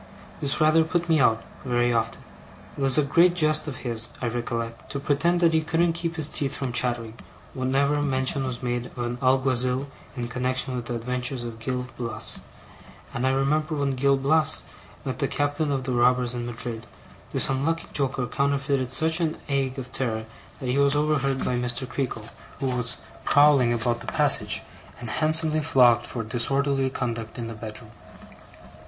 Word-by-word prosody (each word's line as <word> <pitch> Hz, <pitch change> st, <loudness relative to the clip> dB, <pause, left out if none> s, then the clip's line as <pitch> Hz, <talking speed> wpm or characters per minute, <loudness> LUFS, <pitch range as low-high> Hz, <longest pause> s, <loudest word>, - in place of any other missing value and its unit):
This 140 Hz, +2 st, -1 dB
rather 155 Hz, +1 st, +5 dB
put 170 Hz, +1 st, -1 dB
me 160 Hz, -2 st, +3 dB
out, 115 Hz, -3 st, +3 dB, 0.2 s
very 120 Hz, -1 st, +1 dB
often. 115 Hz, -1 st, -1 dB, 0.5 s
It -, -, -7 dB
was 135 Hz, 0 st, +4 dB
a 150 Hz, -, +5 dB
great 170 Hz, +5 st, +4 dB
jest 155 Hz, -2 st, +2 dB
of 135 Hz, -4 st, -5 dB
his, 115 Hz, -1 st, -2 dB
I 120 Hz, -, -1 dB
recollect, 115 Hz, -1 st, -4 dB
to 140 Hz, -, -2 dB
pretend 165 Hz, +5 st, +1 dB
that 165 Hz, -1 st, +4 dB
he 160 Hz, -, +3 dB
couldn't 165 Hz, +1 st, +1 dB
keep 170 Hz, 0 st, -3 dB
his 155 Hz, -3 st, 0 dB
teeth 140 Hz, -3 st, -2 dB
from 130 Hz, -3 st, -3 dB
chattering, 120 Hz, -3 st, 0 dB, 0.4 s
whenever 140 Hz, +3 st, +1 dB
mention 135 Hz, -1 st, 0 dB
was 125 Hz, -1 st, -5 dB
made 120 Hz, 0 st, -2 dB
of -, -, -18 dB
an 120 Hz, 0 st, -3 dB
Alguazill 130 Hz, 0 st, +2 dB, 0.3 s
in 120 Hz, -1 st, -3 dB
connexion 125 Hz, +1 st, -1 dB
with 120 Hz, -1 st, -4 dB
the 120 Hz, -, -3 dB
adventures 125 Hz, +2 st, -3 dB
of 115 Hz, -1 st, -7 dB
Gil 125 Hz, +2 st, -3 dB
Blas; 120 Hz, -1 st, -4 dB, 0.7 s
and 125 Hz, +2 st, 0 dB
I -, -, +4 dB
remember 150 Hz, +4 st, +1 dB
that -, -, -3 dB
when 140 Hz, -1 st, +1 dB
Gil 135 Hz, +1 st, +2 dB
Blas 155 Hz, +3 st, +2 dB, 0.4 s
met 130 Hz, +1 st, -4 dB
the 140 Hz, -, +1 dB
captain 145 Hz, +2 st, -1 dB
of 135 Hz, -2 st, -1 dB
the 130 Hz, -, -2 dB
robbers 125 Hz, 0 st, +2 dB
in 120 Hz, -1 st, -4 dB
Madrid, 115 Hz, -1 st, -5 dB, 0.4 s
this -, -, +2 dB
unlucky 155 Hz, +5 st, -1 dB
joker 135 Hz, -3 st, 0 dB
counterfeited 140 Hz, 0 st, 0 dB
such 160 Hz, +5 st, +2 dB
an 160 Hz, -2 st, -1 dB
ague 135 Hz, -1 st, 0 dB
of 130 Hz, -1 st, -7 dB
terror, 115 Hz, -5 st, -2 dB, 0.3 s
that 130 Hz, -, -5 dB
he 130 Hz, +3 st, +1 dB
was 140 Hz, 0 st, +3 dB
overheard 140 Hz, -3 st, +1 dB
by 125 Hz, -1 st, 0 dB
Mr. 125 Hz, +1 st, -2 dB
Creakle, 125 Hz, -5 st, -4 dB, 0.3 s
who 130 Hz, -2 st, -1 dB
was 125 Hz, -1 st, +1 dB, 0.3 s
prowling 145 Hz, -4 st, +5 dB
about 120 Hz, 0 st, 0 dB
the -, -, -10 dB
passage, -, -, +2 dB, 0.4 s
and 120 Hz, -2 st, -5 dB
handsomely 155 Hz, +1 st, +3 dB
flogged 120 Hz, -5 st, +4 dB
for 115 Hz, -, -4 dB
disorderly 135 Hz, +4 st, +2 dB
conduct 115 Hz, -3 st, -4 dB
in 120 Hz, -, -4 dB
the 115 Hz, -, -6 dB
bedroom. 110 Hz, 0 st, -8 dB
130 Hz, 180 wpm, -25 LUFS, 120-145 Hz, 0.7 s, rather